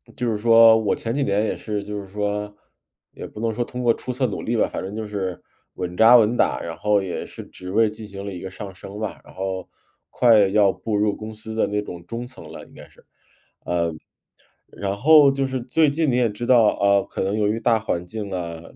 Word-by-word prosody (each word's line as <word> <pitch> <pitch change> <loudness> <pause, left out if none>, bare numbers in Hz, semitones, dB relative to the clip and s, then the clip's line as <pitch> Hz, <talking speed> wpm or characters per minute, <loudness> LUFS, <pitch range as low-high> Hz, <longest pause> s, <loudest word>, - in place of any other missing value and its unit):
就 120 - -1
是 105 - -1
说 115 0 +7
我 110 -2 0
前 115 0 -4
几 140 0 0
年 105 0 +1
也 - - -2
是 105 -2 -4
就 105 0 -5
是 95 - -11
说， 105 +1 -3 0.6
也 - - -8
不 105 - -11
能 115 -1 -1
说 120 +2 -1
通 125 +1 -6
过 120 -1 +4
出 125 - -6
色 130 +1 -1
努 105 - -5
力 120 +1 -1
吧， - - +2
反 - - -5
正 95 - -6
就 110 0 -4
是 95 -4 -4 0.4
稳 90 -1 -5
扎 115 +4 +8
稳 115 +1 +3
打， - - +1
然 85 -1 -6
后 105 -1 +2
也 90 - -4
是 - - -10
职 90 0 -10
位 110 +2 +4
进 110 +1 -10
行 100 -1 -8
了 100 - -5
一 90 - -7
个 95 - -6
上 100 -1 -8
升 100 +3 -10
吧， 110 -2 -5
然 - - -16
后 95 -1 -4 0.4
快 110 -5 +5
要 100 -1 +4
步 110 +1 -4
入 105 0 +1
公 110 +1 -8
司 110 +1 -8
的 - - +1
那 105 0 -1
种 85 -4 -9
中 120 +1 -5
层 130 - -12
了， - - -10
应 - - -21
该 - - -13
是。 - - -23 1.7
呃， - - -15
然 100 0 -2
后 145 +4 +6
就 135 0 -1
是 130 -1 -3
最 150 +5 +2
近 150 +1 +1
你 125 - +1
也 125 -2 +3
知 105 +4 -6
道， 120 -4 +5
呃， 100 0 +4
可 - - -4
能 95 +2 -1
由 105 - +2
于 110 +2 -1
大 115 0 +3
环 90 -5 -3
境 100 +2 -6
啊 85 -3 -4
105 Hz, 260 characters per minute, -22 LUFS, 100-115 Hz, 1.7 s, 扎